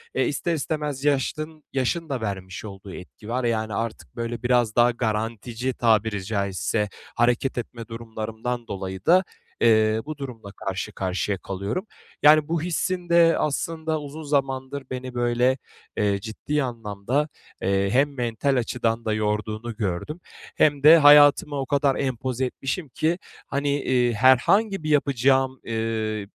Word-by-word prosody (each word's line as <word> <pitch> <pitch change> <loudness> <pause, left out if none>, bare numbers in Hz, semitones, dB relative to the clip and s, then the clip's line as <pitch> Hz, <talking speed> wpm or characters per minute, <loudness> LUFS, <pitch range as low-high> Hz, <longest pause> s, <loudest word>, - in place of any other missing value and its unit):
e, - - +2
ister 170 - -1
istemez 150 -2 -3
yaşdın 155 +2 -1
yaşın 155 +5 -1
da 135 -4 -2
vermiş 95 -2 -5
olduğu 95 -2 -9
etki 105 +4 -11
var. 125 +2 -1
Yani, 110 -2 0
artık, 115 +1 -4
böyle, 115 0 -4
biraz 120 -3 +2
daha 120 0 +5
garantici 115 +2 -2
tabiri 110 -4 +1
caizse 100 +1 -1 0.3
hareket 120 +3 +1
etme 115 -1 -6
durumlarımdan 115 +1 -5
dolayı 95 -2 -6
da, 185 +3 +6 0.4
eee, 110 -1 +4
bu 155 0 -6
durumla 120 -7 -8
karşı 95 +1 -4
karşıya 95 +1 -2
kalıyorum. 100 - -4 0.4
Yani, 150 0 +7
bu 165 -1 -1
hissin 180 +1 -2
de 170 -1 +5
aslında 160 +1 -1
uzun 150 +2 -8
zamandır 135 -1 -1
beni 130 0 -5
böyle, 120 +2 +2 0.4
eee, 100 -1 +1
ciddi 140 +8 -2
anlamda, 115 +3 -2 0.3
eee, 100 +1 +1
hem 140 +4 +2
mental 120 +2 0
açıdan 115 -2 -1
da 110 - +1
yorduğunu 110 +2 -2
gördüm 105 - -3 0.4
hem 145 -2 +3
de 160 +3 +10
hayatıma 145 -1 +7
o 135 - -2
kadar 140 0 +2
empoze 130 -1 -2
etmişim 135 +5 -4
ki, 160 +6 0 0.3
hani, 140 +1 0
iii, 125 -2 +2
herhangi 155 - +4
bir 155 - -2
yapacağım, 135 -2 +3 0.2
ııı, 110 -2 -2
125 Hz, 140 wpm, -24 LUFS, 110-145 Hz, 0.4 s, de